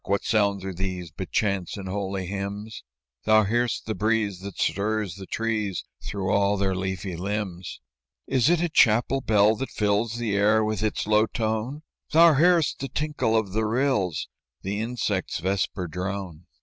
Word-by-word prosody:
What 100 +1 0
sounds 100 -3 +1
are 95 - -4
these 90 -2 -4
But 95 +4 -6
chants 100 -3 0
and 95 -1 -6
holy 95 -1 -3
hymns?" 100 +3 -5 0.4
"Thou 110 0 +5
hear'st 120 +3 0
the 110 - -2
breeze 110 -3 0
that 100 0 -8
stirs 100 +2 0
the 95 0 -10
trees 110 -5 -2 0.2
Through 95 -1 -2
all 100 0 +2
their 95 -1 +1
leafy 95 -1 -3
limbs." 95 -1 -4 0.5
"Is 130 +1 +2
it 175 -1 +3
a 175 - 0
chapel 120 0 +3
bell 105 -1 +4
that 135 - -4
fills 105 +2 0
The 115 -4 -1
air 105 +2 +4
with 110 -2 -1
its 110 -1 -1
low 105 +1 +3
tone?" 115 +7 -2 0.3
"Thou 165 +1 +7
hear'st 170 +2 +3
the 135 - -4
tinkle 150 -6 0
of 105 -4 -1
the 110 +3 0
rills, 110 - 0 0.4
The 100 +2 -2
insect's 110 -5 -2
vesper 95 +1 -1
drone." 90 0 -5
105 Hz, 165 wpm, -25 LUFS, 95-110 Hz, 0.5 s, Thou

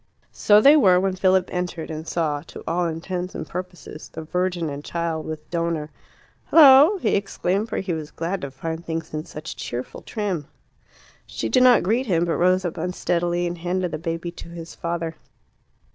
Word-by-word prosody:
So 210 0 +5
they 280 +7 +7
were 185 -11 +5
when 190 0 0
Philip 185 0 +3
entered, 180 -3 -3
and 155 +1 -6
saw, 150 -4 -1
to - - -10
all 175 +1 0
intents 175 +3 -4
and 160 - -5
purposes, 180 -3 -8
the 160 - -7
Virgin 180 0 -1
and 145 0 -6
Child, 165 -1 -3
with 155 -1 -6
Donor. 165 -3 -2 0.6
"Hullo!" 295 +5 +8
he - - +1
exclaimed; 200 +1 -1
for - - -3
he 190 -2 -2
was 155 -2 -5
glad 180 +3 -3
to 140 - -4
find 160 +5 -5
things 165 -1 -5
in 155 +1 -4
such 155 +1 -8
cheerful 125 +1 -6
trim. 195 - -3 0.8
She - - -4
did 255 - +4
not 250 -1 +6
greet 235 +8 +1
him, 170 -4 +2
but 170 - -1
rose 185 +1 +3
up 170 - -3
unsteadily 175 0 -1
and 175 0 -4
handed 180 +1 -1
the - - -4
baby 165 +1 -4
to 170 - -11
his 170 -1 -9
father. 170 -1 -4
175 Hz, 185 wpm, -23 LUFS, 160-185 Hz, 0.8 s, Hullo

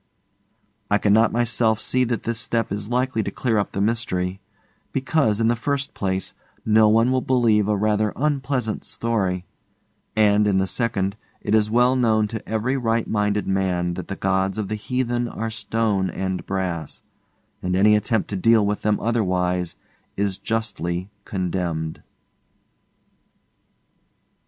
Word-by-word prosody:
I 105 - +4
cannot 105 +2 +4
myself 115 -2 +1
see 130 +2 +1
that 115 -1 -2
this 115 -1 -2
step 115 -4 -1
is 105 +1 -3
likely 125 -1 0
to 100 - -3
clear 115 +1 0
up 100 - -2
the - - -4
mystery; 100 -3 -1 0.5
because, 135 -5 +1
in 115 - +3
the 120 - +3
first 140 +3 -2
place, 95 -1 -2 0.3
no 110 0 +5
one 115 +3 +4
will 130 0 +2
believe 115 -6 +3
a 105 -1 +1
rather 105 0 +1
unpleasant 135 -5 -1
story, 95 -6 -1 0.7
and, 105 -1 +4
in 100 -2 +2
the 95 - +2
second, 100 -2 -1 0.2
it 105 - -2
is 105 -1 +3
well 125 +3 +4
known 110 -4 +2
to 110 0 -7
every 115 +5 0
right 115 -2 0
minded 105 -1 0
man 90 -2 0
that 90 -1 -6
the 95 - -4
gods 95 +1 0
of 105 -3 -3
the - - -2
heathen 120 +3 -1
are 115 -1 -4
stone 110 -2 0
and 95 -1 -3
brass, 90 -5 -3 0.6
and 90 0 -1
any 105 +3 +5
attempt 110 +1 0
to - - -1
deal 110 +2 +4
with 105 0 -1
them 105 -1 +1
otherwise 90 -6 0 0.4
is 100 -1 -1
justly 100 -5 -2
condemned. 85 -4 -3
105 Hz, 150 wpm, -23 LUFS, 95-115 Hz, 0.7 s, no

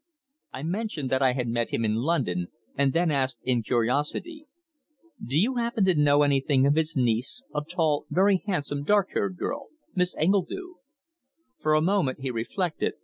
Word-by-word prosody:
I 135 - -7
mentioned 170 - -3
that 130 0 +2
I 130 -2 +4
had 125 -2 -2
met 115 0 -1
him 115 - -1
in 105 - +1
London, 115 - 0 0.3
and 140 -1 +2
then 170 +2 +1
asked 130 -3 0
in 125 -2 +1
curiosity: 145 - -1 0.8
"Do 135 +5 +1
you 245 +7 +1
happen 235 -4 +1
to 185 - +4
know 145 -1 +4
anything 140 -1 +2
of 140 - +4
his 160 0 0
niece, 125 - 0
a 150 - -1
tall, 155 -1 0
very 190 0 +3
handsome, 145 -7 -1
dark 200 +4 +3
haired 185 -2 -1
girl, 280 +7 -4 0.3
Miss 180 -1 0
Engledue?" 200 - -1 0.8
For 155 0 +2
a 155 - +3
moment 170 -8 +1
he 135 -1 -2
reflected. 155 - -2
150 Hz, 170 wpm, -26 LUFS, 130-185 Hz, 0.8 s, I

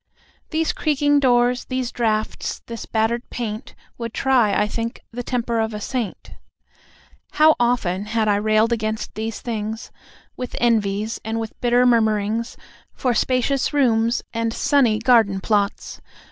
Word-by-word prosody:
These 320 0 0
creaking 290 -1 +2
doors, 245 -1 +2
these 255 -2 -3
draughts, 220 -2 -2
this 230 -1 -7
battered 225 +2 -1
paint, 220 0 -5 0.2
Would 230 -1 -5
try, 255 -6 +3
I 210 - +2
think, 230 +2 -4
the 245 +1 -5
temper 235 -2 -1
of 220 -1 -1
a - - -4
saint, 230 -2 -4 1.0
How 310 +1 +6
often 210 -6 0
had 220 0 0
I 205 -1 +3
railed 215 +2 +2
against 220 -1 -3
these 220 0 -4
things, 220 -1 -4 0.4
With 250 -1 -6
envies, 215 -2 0
and 225 +1 -2
with 225 -1 -5
bitter 245 0 +3
murmurings 220 -1 +1 0.4
For 250 -2 0
spacious 255 +4 +1
rooms, 235 -4 +2
and 230 0 -1
sunny 270 -4 +2
garden 220 -4 +3
plots! 205 0 -1
230 Hz, 140 wpm, -22 LUFS, 215-245 Hz, 1.0 s, How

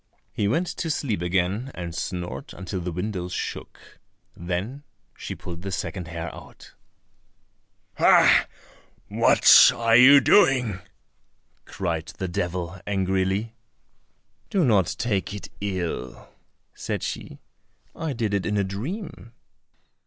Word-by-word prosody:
He 100 - 0
went 165 - +1
to 165 - -3
sleep 120 - -2
again 95 +7 -1
and 85 -2 -6
snored 85 -6 -5
until 95 0 -5
the 90 +1 -4
windows 90 0 -4
shook. - - -7 0.4
Then 95 +11 -4 0.3
she - - -7
pulled 85 -1 -8
the 95 +1 -5
second 90 -1 -4
hair 85 +1 -6
out. - - -14 1.3
"Ha! - - +6 0.6
what - - +7
are 115 -1 +2
you 135 +4 +9
doing?" 125 - +3 0.9
cried 85 -4 -3
the 95 - -3
devil 90 0 -4
angrily. 95 +2 -1 1.0
"Do 190 -5 +2
not 100 -8 +2
take 105 -4 -2
it 105 - -8
ill," 90 -11 -4 0.4
said - - -4
she, - - -6 0.6
"I 160 -3 -3
did 115 -4 -2
it 100 -2 -1
in 105 0 0
a 100 - +2
dream." 115 - -6
95 Hz, 120 wpm, -24 LUFS, 90-115 Hz, 1.3 s, you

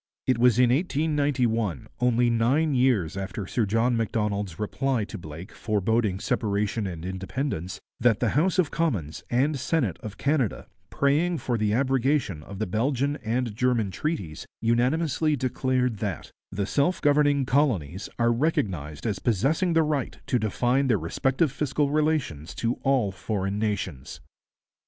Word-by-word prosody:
It 130 -2 +2
was 125 -2 +5
in 125 -1 +5
1891, 135 - 0
only 120 -1 +3
nine 135 +7 +2
years 125 -11 +2
after 95 +1 -4
Sir 110 +2 0
John 115 +4 +2
Macdonald's 105 -5 -1
reply 125 +3 -1
to 105 - -7
Blake 80 +2 -9
foreboding 105 -2 0
separation 105 0 -1
and 85 -2 -6
independence, 95 - -4 0.2
that 115 -2 +3
the 120 - +1
House 165 - +1
of 175 -5 +2
Commons 105 - -2
and 135 +4 +1
Senate 130 - 0
of 105 -2 -7
Canada, 140 - 0 0.2
praying 155 +5 +1
for 125 -5 -2
the 105 -2 +1
abrogation 130 - +1
of 100 +5 -9
the 110 - -1
Belgian 135 +8 0
and 115 0 -2
German 120 -4 +1
treaties, 95 - -4
unanimously 145 +7 +1
declared 130 -2 0
that 100 -5 -4 0.2
'the 100 +1 -2
self 145 - +1
governing 145 -1 +3
colonies 110 - 0
are 120 0 +3
recognized 95 - -1
as 105 -4 -1
possessing 140 - +1
the 165 0 +4
right 150 -4 -2
to 125 - +1
define 120 +5 +1
their 115 -5 +3
respective 135 - 0
fiscal 140 +1 0
relations 150 - 0
to 115 +1 -1
all 130 -7 +2
foreign 95 0 -3
nations.' 95 -10 -3
120 Hz, 145 wpm, -26 LUFS, 100-140 Hz, 0.2 s, was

